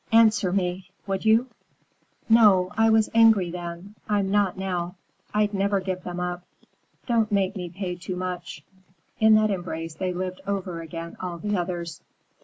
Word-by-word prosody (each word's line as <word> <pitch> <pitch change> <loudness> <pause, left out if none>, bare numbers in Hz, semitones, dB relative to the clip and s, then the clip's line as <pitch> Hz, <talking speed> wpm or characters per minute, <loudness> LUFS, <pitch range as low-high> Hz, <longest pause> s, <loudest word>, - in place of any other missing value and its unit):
"Answer 220 -4 +5
me, 185 0 -2 0.2
would 195 +1 -3
you?" 220 +3 +5 0.8
"No, 205 -5 +5
I 225 0 +4
was 220 -1 +3
angry 220 -6 +5
then. 175 +3 -7 0.2
I'm 200 -2 +1
not 205 -3 +2
now. 180 -2 -3 0.4
I'd 210 0 +1
never 200 0 +1
give 185 -1 -3
them 180 0 -6
up. 180 0 -3 0.6
Don't 230 -3 +1
make 200 0 +1
me 180 -3 -5
pay 180 0 -5
too 180 +1 -5
much." 180 -4 -5 0.6
In 220 0 +6
that 215 -1 +3
embrace 165 -3 -4
they 185 +3 -2
lived 185 +1 -4
over 185 -4 -3
again 165 +1 -7
all 180 -2 -4
the 205 +4 -2
others. 175 -2 -4
185 Hz, 160 wpm, -25 LUFS, 180-210 Hz, 0.8 s, In